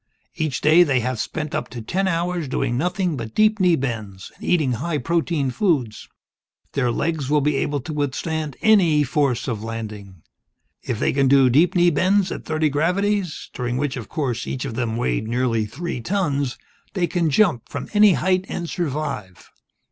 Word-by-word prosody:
Each 155 -5 -2
day, 155 +3 +6
they 135 -7 +3
have 125 0 -2
spent 150 +6 -4
up - - -2
to 120 - -7
ten 185 - -1
hours 175 -2 -1
doing 130 -2 -1
nothing 180 +4 0
but 115 -2 -7
deep 215 0 +3
knee 180 -3 +4
bends, 110 - -5
and - - -16
eating 155 -7 +2
high 150 +7 -2
protein 160 -1 0
foods. 130 - -1 0.6
Their 130 -3 +1
legs 150 0 -2
will 150 0 +4
be 145 0 +1
able 145 0 -1
to 155 +5 -6
withstand 150 +1 -2
any 175 -9 +5
force 140 -3 0
of 110 -4 -3
landing. 105 -6 -7 0.6
If - - -3
they - - +1
can 135 0 +2
do 135 -1 +5
deep 165 - +4
knee 175 -1 +5
bends 185 +4 +2
at - - -6
thirty 155 0 +1
gravities 180 +4 0
during 125 0 -2
which, 145 0 -1
of 120 -5 -7
course, 130 -7 -2
each 130 +1 -3
of 130 - -4
them 115 -1 -2
weighed 65 - -1
nearly 115 -2 0
three 140 +3 -5
tons 145 - -1 0.4
they 180 -3 +2
can 170 -1 0
jump 150 - +2
from - - -5
any 210 -2 +6
height 185 +1 +1
and 170 - -4
survive. 145 - -4
145 Hz, 180 wpm, -22 LUFS, 125-175 Hz, 0.6 s, day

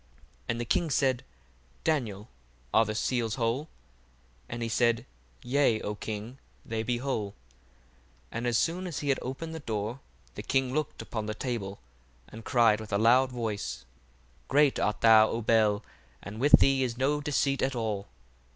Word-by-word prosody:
1:17 - - -33 0.4
And 115 - -1
the - - -3
king 165 +7 +1
said, 130 -2 +1 0.6
Daniel, 115 -10 -1 0.5
are 115 - +5
the 110 0 -3
seals 115 -1 0
whole? 125 +6 -1 0.8
And 120 0 -4
he - - -1
said, 115 0 +2 0.4
Yea, 125 -3 +2
O 105 - -3
king, 110 +4 -6 0.3
they 115 -1 -2
be 120 +2 -1
whole. 120 -6 -2
1:18 - - -32 0.9
And 120 +2 -3
as 120 -1 +2
soon 180 +6 0
as 170 - -4
he 145 - -2
had 135 - +2
opened 150 +6 -5
the 160 - -5
dour, 110 -1 -3 0.3
the - - -6
king 130 -1 0
looked 155 0 -2
upon 110 -2 -4
the 110 - -3
table, 105 -5 -4 0.5
and 110 +1 -11
cried 115 -4 +4
with 110 - -9
a 100 - +2
loud 125 +4 +4
voice, 105 - -4 0.6
Great 145 0 +3
art 105 0 0
thou, 110 -1 +7
O 115 - -2
Bel, 110 -2 +3 0.4
and 105 +2 -7
with 145 +4 +2
thee 135 -1 +4
is 120 -2 -1
no 145 +3 +1
deceit 140 -1 0
at 135 0 0
all. 105 -4 -2
120 Hz, 175 wpm, -29 LUFS, 110-135 Hz, 0.9 s, thou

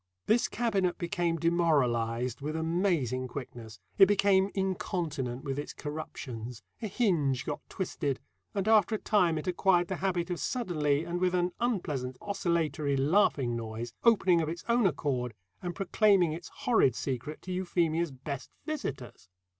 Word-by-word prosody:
This 235 +2 +3
cabinet 200 -7 0
became 170 -2 0
demoralised 125 -8 +1
with 150 +2 -3
amazing 160 - 0
quickness; 120 -4 -8 0.2
it 195 - +9
became 195 -1 +3
incontinent 165 -9 -2
with 135 0 -3
its 145 - -5
corruptions, 125 -6 -6 0.2
a 220 - -2
hinge 165 - +1
got - - -3
twisted, 145 -7 -2 0.4
and 195 0 -1
after 220 -1 +5
a - - 0
time 180 -7 +2
it 155 - -4
acquired 180 -1 +2
the 190 - -2
habit 180 0 -1
of 175 - -2
suddenly, 155 - 0
and 175 +1 -3
with 180 0 +2
an 180 0 +1
unpleasant 150 - -1
oscillatory 165 -8 0
laughing 140 - +2
noise, 115 0 -5
opening 190 -7 +5
of 155 - -1
its 170 +1 -5
own 235 -3 +4
accord 130 - -2 0.3
and 175 -2 -4
proclaiming 195 -4 +3
its 165 +1 -7
horrid 225 - +2
secret 135 +3 -4
to 185 - -6
Euphemia's 170 -2 0
best 135 +1 -6 0.2
visitors. 135 - -5
170 Hz, 145 wpm, -30 LUFS, 135-190 Hz, 0.4 s, it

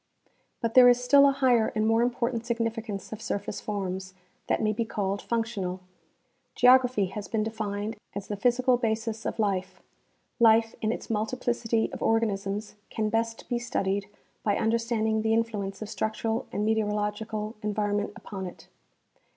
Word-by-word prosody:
But 230 -2 -1
there 250 -1 +9
is 245 0 +5
still 280 +3 +7
a - - +3
higher 255 -5 +3
and 215 0 +1
more 225 +1 +3
important 240 -1 0
significance 225 -4 -3
of 220 0 -6
surface 205 -2 -3
forms, 190 -2 -4 0.3
that - - +1
may 215 0 +1
be 230 - 0
called 200 -3 -2
functional. 225 -6 -2 0.8
Geography 250 -4 +5
has 210 -1 -5
been 220 -2 0
defined 215 -1 -3 0.2
as 200 -1 -4
the 205 - -3
physical 250 +3 +3
basis 225 -1 -2
of - - -3
life; 190 -3 -1 0.6
life 225 -1 +5
in 215 - +1
its 230 - -5
multi 220 +3 -1
plicity 230 -2 0
of - - -6
organisms 210 -2 0 0.2
can 215 -1 -1
best 225 0 -1
be 240 - -1
studied 200 -4 -1 0.3
by 205 -2 +1
understanding 225 -1 +1
the 220 0 +2
influence 210 -3 -2
of 215 - -8
structural 220 +2 -2
and 210 - -1
meteorological 215 0 -1
environment 205 0 -1
upon 190 -2 -6
it. 180 - -12
220 Hz, 155 wpm, -27 LUFS, 205-230 Hz, 0.8 s, there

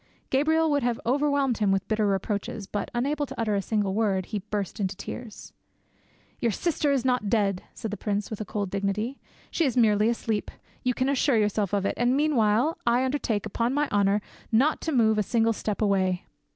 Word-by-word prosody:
Gabriel 315 +4 +3
would 285 -1 +2
have 240 -2 0
overwhelmed 280 -1 +1
him 205 -2 +2
with 195 0 0
Bitter 215 -1 +1
reproaches, 200 +1 -2
but, 205 +1 -4
unable 285 +4 -1
to - - -9
utter 220 -2 0
a 200 - +1
single 205 -1 -1
word, 200 -3 +1
he 210 - -3
burst 205 +1 -4
into 195 -1 -1
tears. 215 +3 -8 0.9
"Your 235 - +1
sifter 300 - 0
is 265 -3 +1
not 250 -5 +1
dead," 200 -4 +1
said 220 -4 -5
the 210 - -4
prince, 205 +1 -2
with 215 0 -3
cold 200 -3 -3
dignity; 200 +6 -2 0.3
"she 335 - +1
is 260 -5 0
merely 215 -2 +4
asleep. 225 -3 -2 0.3
You 250 -1 0
can 260 - 0
assure 275 -2 +2
yourself 210 -2 +1
of 200 -1 0
it, - - +1
and 245 +2 +2
meanwhile 270 -1 +2
I 245 +2 +3
undertake, 250 -6 -1
upon 230 +4 -1
my 295 0 +2
Honour, 200 0 +2 0.3
not 265 +8 +3
to 325 - -2
move 220 -5 +3
a - - +4
single 225 +2 +2
step 215 0 -2
away." 190 -3 +1
220 Hz, 195 wpm, -26 LUFS, 205-255 Hz, 0.9 s, merely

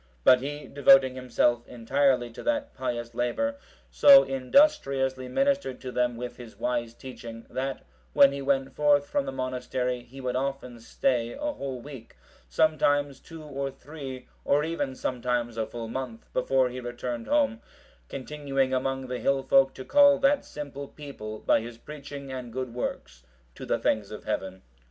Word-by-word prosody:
But 125 - +6
he, 145 +2 -5
devoting 135 -2 +5
himself 120 -2 +1
entirely 125 0 +1
to - - -9
that 290 -1 -1
pious 120 -2 -4
labour, 280 - -1 0.3
so 275 -1 +8
industriously 135 - +2
ministered 275 - 0
to 130 - -6
them 125 -1 0
with 125 +1 -6
his 120 -3 -11
wise 120 -2 -2
teaching, 115 -3 -9
that 135 +1 -3 0.3
when 140 - +7
he 140 0 -5
went 135 -1 0
forth 145 -1 +3
from 285 -1 -1
the - - -2
monastery, 125 - -2
he 125 +3 -13
would 125 -1 -2
often 130 -2 -3
stay 120 0 -1
a 295 0 -3
whole 135 - -5
week, 135 -4 -11 0.3
sometimes 145 - +2
two 165 -1 -11
or 140 -2 -4
three, 135 -1 -9 0.2
or 145 +1 +2
even 160 -5 -2
sometimes 120 -2 -2
a 110 -1 -2
full 115 -1 -6
month, 120 -1 -6
before 130 0 +2
he 125 +1 -6
returned 120 -1 -5
home, 280 -6 +2 0.5
continuing 135 -1 -2
among 135 +1 -1
the 125 -1 -4
hill 135 -1 +1
folk 135 0 +4
to 130 - -8
call 285 -1 +6
that 275 +1 +3
simple 140 -1 -7
people 135 -9 -8
by - - +2
his 115 0 -8
preaching 140 0 -9
and 125 -2 -6
good 130 0 -4
works 120 - -5 0.3
to - - -9
the - - +1
things 105 -2 0
of 105 - -8
Heaven. 95 -3 -4
130 Hz, 165 wpm, -27 LUFS, 125-145 Hz, 0.5 s, so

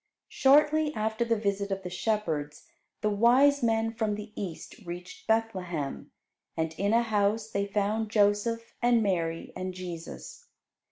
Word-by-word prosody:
Shortly 300 +2 +4
after 220 +2 0
the 230 -1 +1
visit 200 -1 -1
of 195 0 -3
the 180 - -5
shepherds, 165 -8 -2 0.4
the 215 - +1
wise 255 +7 +5
men 225 -1 +1
from 220 -2 -1
the 210 +1 -8
East 180 -6 -7
reached 175 +1 -9
Bethlehem, 185 -10 -1 0.5
and 160 0 -1
in 200 +1 +1
a 230 +1 +4
house 215 0 0
they 200 0 -1
found 210 +2 0
Joseph, 215 +2 +1
and 240 -2 +4
Mary, 165 -4 -1
and 185 0 -4
Jesus. 185 - -8
210 Hz, 145 wpm, -28 LUFS, 185-230 Hz, 0.5 s, wise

